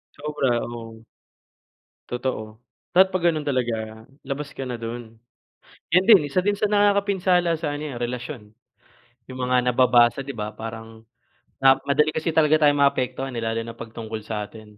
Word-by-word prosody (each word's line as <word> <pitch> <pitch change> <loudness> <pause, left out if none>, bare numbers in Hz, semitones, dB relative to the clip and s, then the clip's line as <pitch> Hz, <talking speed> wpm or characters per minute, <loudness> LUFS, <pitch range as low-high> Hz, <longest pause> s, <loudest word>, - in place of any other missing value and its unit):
Sobra, 140 -5 -1
oo. 115 -1 -9 1.0
Totoo. 115 -3 -4 0.3
Dapat 190 +1 +6
'pag 180 -2 -1
ganun 155 -2 -4
talaga, 110 -4 -2 0.2
labas 140 +1 -4
ka 135 - -6
na 125 - -4
dun. 115 0 -7 0.8
Yun 185 +1 +5
din 180 -9 +7
isa 180 +6 +1
din 205 0 +1
sa 210 - +1
nakakapinsala 200 -4 +2
sa 155 -2 -3
ano 145 +1 -5
yan, 120 - -7
relasyon. 120 -2 -5 0.8
Yung 130 - -8
mga 125 -1 +2
nababasa 120 +1 +4
di 140 -2 -7
ba, 105 0 -5
parang 115 0 -8 0.6
na 135 0 +7
madali 150 +2 +3
kasi 160 +1 -1
talaga 155 0 +4
tayong 145 0 +3
maapektuhan, 130 -1 0
eh, 115 - -3
lalo 115 0 -1
na 115 0 -9
'pag 115 -1 -9
tungkol 110 -1 -6
sa 105 -1 -4
atin. 105 -2 -15
125 Hz, 160 wpm, -23 LUFS, 115-150 Hz, 1.0 s, din